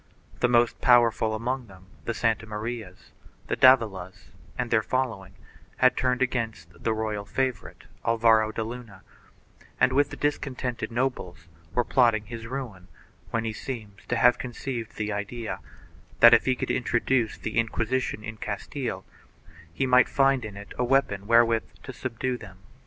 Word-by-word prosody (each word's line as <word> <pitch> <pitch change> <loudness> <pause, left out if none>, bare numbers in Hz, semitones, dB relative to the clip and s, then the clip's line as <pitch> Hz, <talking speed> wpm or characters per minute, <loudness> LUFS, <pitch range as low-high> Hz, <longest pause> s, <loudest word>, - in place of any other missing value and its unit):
The - - +3
most 120 -1 +2
powerful 115 -3 +4
among 125 +2 -3
them 95 -2 -16
— - - -26
the 115 - -2
Santa 115 -1 0
Marias, 110 -3 -6 0.3
the - - -1
Davilas 105 -8 +3 0.3
and 125 -2 -2
their 115 -2 +4
following 110 -6 -2 0.2
— - - -29
had 130 0 +4
turned 125 0 +1
against 115 -10 -3
the 115 - +1
royal 110 -2 -2
favorite 130 +2 -3 0.2
Alvaro 110 -1 +3
de 110 - -3
Luna 115 -4 -9 0.8
and, 130 - +4
with 145 +1 +3
the - - -8
dis 145 0 0
contented 125 -3 -4
nobles, 115 -9 -3 0.3
were 120 - +3
plotting 115 -4 +3
his 115 0 -8
ruin, 115 -8 -6 0.4
when 115 0 -1
he 110 - -2
seems 110 -5 -7
to 120 - 0
have 125 +1 +4
conceived 120 -2 -5
the 105 0 -2
idea 110 +3 -4 0.6
that, 120 0 +9
if - - +5
he 130 - +2
could - - -2
introduce 120 -1 0
the 110 +1 -2
Inquisition 115 0 -1
in 110 0 -7
Castile, 105 0 -4 0.7
he 110 +11 -1
might 125 -1 +5
find 135 -2 +3
in 105 -2 -7
it 100 0 -10
a - - +2
weapon 120 -6 +1
wherewith 115 -1 +4 0.2
to 130 - -8
subdue 125 0 -3
them. 95 -4 -12
115 Hz, 165 wpm, -26 LUFS, 110-125 Hz, 0.8 s, that